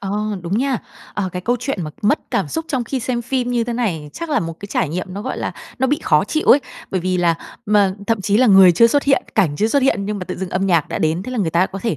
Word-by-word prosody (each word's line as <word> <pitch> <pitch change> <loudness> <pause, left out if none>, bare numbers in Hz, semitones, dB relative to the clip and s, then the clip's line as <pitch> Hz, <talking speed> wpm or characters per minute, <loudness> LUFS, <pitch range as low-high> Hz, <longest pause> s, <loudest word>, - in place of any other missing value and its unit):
Ờ, 195 -1 -4 0.3
đúng 185 +5 -1
nha. 265 -2 0 0.4
Ờ, 200 -2 -1
cái 180 - -5
câu 245 +5 +1
chuyện 250 -9 -2
mà 155 - -5
mất 210 +9 +3
cảm - - 0
xúc 325 0 -3
trong 255 -4 -1
khi 260 +2 -3
xem 240 0 -2
phim 250 0 -1
như 240 -1 +1
thế 240 - -3
này, 170 -12 -2
chắc 335 -1 -6
là 295 - +2
một 165 0 -4
cái 200 - -6
trải 190 -4 -1
nghiệm 180 +5 -3
nó, 205 - -5
gọi 260 - -4
là, - - -3 0.3
nó 265 - +2
bị 290 +3 +1
khó 150 +6 +3
chịu 310 +9 -2
ấy. 280 - +7 0.3
Bởi 190 - -1
vì 185 +1 0
là 170 -2 +2 0.7
thậm 225 -3 +1
chí 205 +1 +1
là 255 +1 +4
m 205 - +5
người 190 -2 +8
chưa 230 +7 +6
xuất 285 +4 +2
hiện, 275 -1 +2
cảnh 165 -9 +2
chưa 215 - +1
xuất 280 +3 +2
hiện, 205 -7 +2
nhưng 210 -1 -3
mà 185 - -5
tự - - -6
dưng 190 -1 -5
âm 190 +1 0
nhạc 170 -5 +2
đã - - -3
đến, 160 +3 0
thế 255 - -6
là 250 - -3
người 180 -6 0
ta 175 +3 +3
có 195 - -7
thể, 225 -10 -1
205 Hz, 305 wpm, -19 LUFS, 180-250 Hz, 0.7 s, người